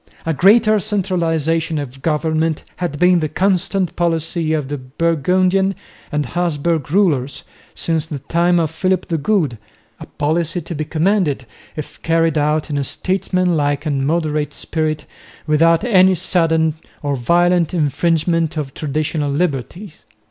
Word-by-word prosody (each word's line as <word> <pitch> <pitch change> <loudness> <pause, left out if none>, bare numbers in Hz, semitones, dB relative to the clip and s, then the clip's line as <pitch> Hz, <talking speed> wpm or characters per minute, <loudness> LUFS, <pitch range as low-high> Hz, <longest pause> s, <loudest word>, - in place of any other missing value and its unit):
A 165 - 0
greater 215 +6 +5
centralisation 165 -6 0
of 135 -2 -6
government 160 0 0
had 175 -5 -3
been 180 +2 +4
the 155 -2 -2
constant 185 +2 0
policy 165 -1 -1
of 150 -4 -1
the 145 0 -4
Burgundian 180 +7 +1 0.4
and 150 -1 -1
Habsburg 165 -1 -1
rulers 155 -9 +1 0.3
since 160 -1 -1
the 150 - -5
time 170 +5 +1
of 160 -2 0
Philip 185 +3 -1
the 165 -2 0
Good, 150 - 0 0.4
a - - -9
policy 165 +3 -1
to 170 - -7
be 155 -1 -3
commended 160 -4 0 0.3
if 155 - -8
carried 165 -1 +1
out 150 +1 0
in 145 - 0
a - - 0
statesmanlike 170 -4 0
and 140 -3 0
moderate 155 -2 -1
spirit 155 -1 -2 0.4
without 165 +2 +3
any 190 -5 +5
sudden 165 -3 +1 0.3
or 145 -1 0
violent 175 +6 +2
infringement 165 0 0
of 140 -3 -4
traditional 150 0 -2
liberties. 155 - -3
165 Hz, 135 wpm, -18 LUFS, 150-180 Hz, 0.4 s, greater